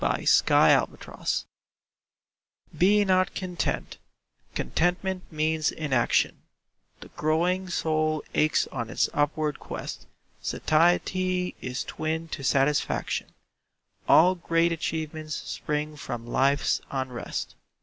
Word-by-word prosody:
BE - - +2
NOT - - +4
CONTENT - - -4 1.3
Be 205 +3 +4
not 185 -1 +2
content—contentment 180 - -3
means 155 0 +1
inaction; 135 -6 +1 0.6
The - - -11
growing 175 +4 0
soul 155 -2 0
aches 155 0 +2
on 120 -4 -4
its - - +1
upward 150 0 0
quest; - - -7 0.3
Satiety 180 +3 +1
is 125 0 -3
twin 160 +1 -3
to 140 - -6
satisfaction; 140 +2 +1 0.8
All 180 +3 +7
great 170 -1 +1
achievements 155 -1 -3
spring 150 0 -3
from 120 -5 -6
life's 135 +4 +2
unrest. 130 -3 -4
155 Hz, 95 wpm, -26 LUFS, 150-175 Hz, 1.3 s, All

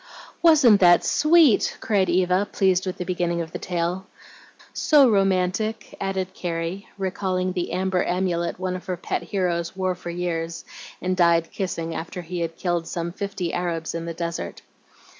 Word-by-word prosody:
"Wasn't 290 -11 +6
that 175 -2 +6
sweet?" 305 -5 +4
cried 195 -4 +1
Eva, 185 +3 +2
pleased 190 -1 +2
with 185 - -3
the 180 - -4
beginning 175 -1 -1
of 165 -1 -4
the - - -5
tale. 180 +2 -2 0.7
"So 290 -3 +5
romantic!" 195 +1 0
added 190 -1 -2
Carrie, 170 +3 -4
recalling 185 -1 -1
the 180 -2 -3
"amber 185 0 0
amulet" 175 -2 -1
one 185 0 -2
of 185 - -8
her 180 -1 -2
pet 175 - -3
heroes 170 -1 -2
wore 185 -1 0
for 180 -1 -8
years, 170 -1 -3 0.4
and 185 0 0
died 170 -2 +3
kissing, 165 -4 -3
after 170 +3 -6
he 175 +1 -5
had 165 -1 -3
killed 175 -3 -1
some 170 0 -3
fifty 195 -2 -4
Arabs 165 -2 -2
in 165 0 -4
the 170 - -4
desert. 170 0 -5
180 Hz, 160 wpm, -24 LUFS, 170-190 Hz, 0.7 s, Wasn't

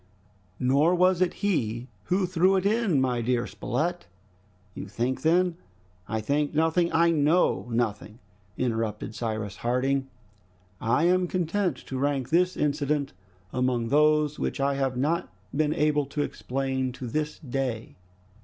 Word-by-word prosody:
"Nor 140 +7 +3
was 185 0 +3
it 185 - +3
he 120 - 0 0.2
who 185 +1 +1
threw 185 +2 +3
it 190 0 0
in, 210 - +2
my 125 -2 +1
dear 120 0 0
Spilett." 170 +8 -3 0.7
"You 100 - -7
think 120 +6 -2
then 175 +1 +2 0.2
" 90 -1 -34
"I - - -2
think 145 +6 0
nothing, 160 +2 +2
I 170 +1 +4
know 155 -2 +2
nothing!" 110 -2 -2 0.4
interrupted 115 -3 -2
Cyrus 110 -3 -4
Harding. 135 +3 0 0.7
"I 115 +8 +2
am 180 +1 +3
content 180 -2 0
to 130 - -4
rank 135 -2 0
this 180 +3 +2
incident 145 -1 0 0.4
among 125 -2 0
those 150 0 +3
which - - -2
I 140 0 +2
have 135 -2 -1
not 155 +6 0 0.3
been 155 0 +1
able 150 -2 +1
to 145 +1 -2
explain 130 -1 -2
to 130 - -7
this 150 +5 -2
day!" 130 -4 -4
140 Hz, 145 wpm, -27 LUFS, 125-165 Hz, 0.7 s, I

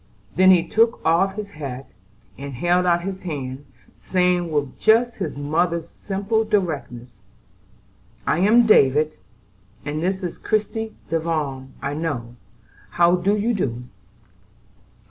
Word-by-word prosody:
Then 185 0 +6
he 175 -2 +5
took 230 +2 +2
off 190 +4 +2
his 205 -1 -6
hat, 135 -5 -7 0.4
and 140 +1 -7
held 175 +6 +1
out 175 0 +2
his 190 0 -5
hand, 140 -5 -5 0.3
saying 180 -2 0
with 145 -3 -2
just 235 +2 +3
his - - -4
mother's 165 +3 0
simple 200 +5 -2
directness: 145 - -3 1.1
"I - - +1
am 225 +6 +5
David; 155 -6 +4 0.7
and 150 +1 -3
this 190 +2 -1
is 175 - -5
Christie 220 +1 -2 0.2
Devon, 150 -5 -2
I 140 - -2
know. 140 -7 -4 0.5
How 175 +1 +4
do 195 +4 +1
you 225 +4 0
do?" 125 - -2
170 Hz, 125 wpm, -22 LUFS, 145-195 Hz, 1.1 s, Then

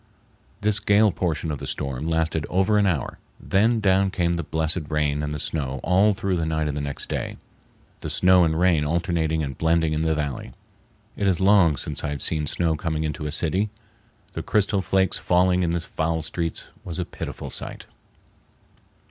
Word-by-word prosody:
This 105 0 +2
gale 105 +1 +4
portion 80 -2 -2
of 75 - -4
the - - -6
storm 70 +3 -3
lasted 80 -1 0
over 95 +3 +2
an 100 - +3
hour, 80 -8 -2 0.2
then 110 +4 +2
down 95 -1 +3
came 85 -2 0
the 85 - -1
blessed 80 0 -2
rain 75 -1 0
and 75 0 -3
the 75 - -3
snow 70 -3 -3
all 100 +3 +4
through 95 -1 -1
the 80 - -1
night 80 -1 0
and 75 - -2
the 75 - -2
next 70 -1 -5
day, - - -4 0.6
the - - -5
snow 90 -1 +5
and 80 -1 +1
rain 90 -4 +3
alternating 80 0 0
and 70 -3 -5
blending 80 -1 +2
in 75 - 0
the 80 -1 +1
valley. 70 -5 -4 0.6
It 100 - 0
is 95 -2 +2
long 95 -6 +5
since - - -3
I - - -1
have 75 -1 -4
seen 75 -2 0
snow 80 +1 +1
coming 80 0 -2
into 75 0 -3
a - - -4
city. 90 +7 0 0.6
The - - -4
crystal 100 -1 +1
flakes 95 0 +1
falling 90 +1 +3
in 85 - +1
the 85 +1 0
foul 80 -1 -2
streets 85 +1 -4
was 85 - -6
a 90 - -2
pitiful - - -7
sight. - - -6
85 Hz, 190 wpm, -24 LUFS, 75-95 Hz, 0.6 s, snow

